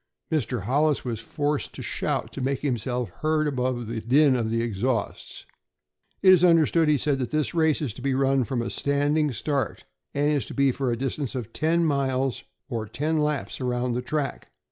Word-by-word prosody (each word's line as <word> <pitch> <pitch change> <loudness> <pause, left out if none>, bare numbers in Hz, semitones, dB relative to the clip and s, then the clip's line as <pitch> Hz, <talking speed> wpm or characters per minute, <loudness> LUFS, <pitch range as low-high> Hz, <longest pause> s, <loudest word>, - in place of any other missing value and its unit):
Mr. 125 -8 -1
Hollis 145 +6 +1
was 115 -3 -3
forced 145 +4 -2
to - - -7
shout - - -2
to 135 - -5
make 135 +1 -1
himself 125 -3 -1
heard 155 0 +2
above 125 -3 -1
the 110 0 -4
din 135 +4 +4
of 115 -3 0
the 115 +1 0
exhausts. 115 0 -3 0.8
"It 185 - +9
is 180 -1 +4
understood," 165 -1 +4
he 150 -1 +4
said, 140 0 0
"that 125 - -2
this 155 +1 -1
race 160 -2 +2
is 125 -8 -2
to 125 - -11
be 135 0 0
run 135 0 +2
from 120 0 -2
a - - -4
standing 145 +1 +1
start, 140 +3 -2 0.3
and 145 +1 +2
is 145 -3 0
to - - -8
be 140 -1 +3
for 130 -1 -1
a 115 - -1
distance 135 +1 -3
of 115 -3 -5
ten 165 +2 +2
miles, 135 -3 0 0.2
or 115 -5 -3
ten 150 +9 -1
laps 150 -2 -1
around 125 0 -1
the 120 +1 -1
track. 145 +2 -3
135 Hz, 195 wpm, -25 LUFS, 125-150 Hz, 0.8 s, It